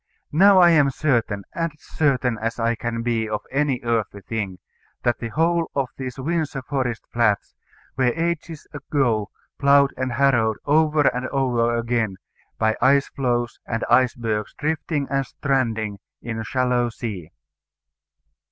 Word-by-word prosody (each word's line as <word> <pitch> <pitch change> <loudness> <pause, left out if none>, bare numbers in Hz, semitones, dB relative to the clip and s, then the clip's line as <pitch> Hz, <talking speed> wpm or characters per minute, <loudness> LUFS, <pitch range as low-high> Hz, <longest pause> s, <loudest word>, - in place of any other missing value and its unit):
Now 195 +5 +6
I 175 -2 +7
am 145 -4 +5
certain, 120 -8 0
as 165 -2 -2
certain 130 -7 0
as 115 +2 -2
I 115 +1 +2
can 115 0 -3
be 115 -2 0
of 105 -1 -2
any 135 -2 0
earthly 110 -4 -1
thing, 100 -4 -4 0.5
that 120 -1 +1
the 115 - -4
whole 165 +6 +1
of 135 -3 0
these 130 -1 -6
Windsor 150 -1 -2
Forest 130 -4 -2
Flats 105 -4 +1 0.4
were 130 0 +1
ages 165 -1 -3
ago 130 -7 0 0.3
ploughed 140 0 +5
and 130 -1 -2
harrowed 120 -5 +2
over 155 +1 +3
and 130 -2 +1
over 120 -4 +1
again, 115 -4 -1 0.4
by 110 0 +2
ice 140 +2 +4
floes 120 -3 -1
and 115 -1 -2
icebergs 115 -4 +1
drifting 155 -1 -1
and 135 0 +1
stranding 115 -7 -1 0.2
in 115 -1 -5
a - - -3
shallow 125 0 +1
sea." 105 -8 -6
125 Hz, 145 wpm, -23 LUFS, 115-140 Hz, 0.5 s, I